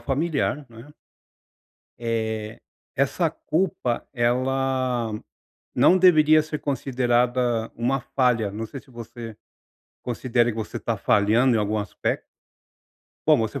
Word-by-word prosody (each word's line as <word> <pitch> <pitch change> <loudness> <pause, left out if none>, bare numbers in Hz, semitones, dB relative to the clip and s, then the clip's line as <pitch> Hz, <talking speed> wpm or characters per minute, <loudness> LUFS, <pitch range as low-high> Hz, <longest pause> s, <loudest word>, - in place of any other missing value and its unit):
familiar, 140 -1 -1
não 115 -1 -15
é. 145 +5 -14 1.1
Eh, 110 -2 -3 0.4
essa - - +1
culpa, 155 -7 -2
ela 130 -1 0 0.6
não 185 - +5
deveria 155 -4 +6
ser 155 0 -5
considerada 125 -3 0
uma 125 +4 0
falha. 125 -5 +1
Não 110 +2 -4
sei 135 +3 -8
se 135 - -23
você 115 -2 -9 0.7
considera 120 0 0
que 110 - -9
você 110 -1 -4
tá - - -2
falhando 115 +5 +3
em - - +2
algum 105 +1 0
aspecto. 105 - -3 1.0
Bom, - - +6
você 115 +4 -2
120 Hz, 120 wpm, -24 LUFS, 115-135 Hz, 1.1 s, deveria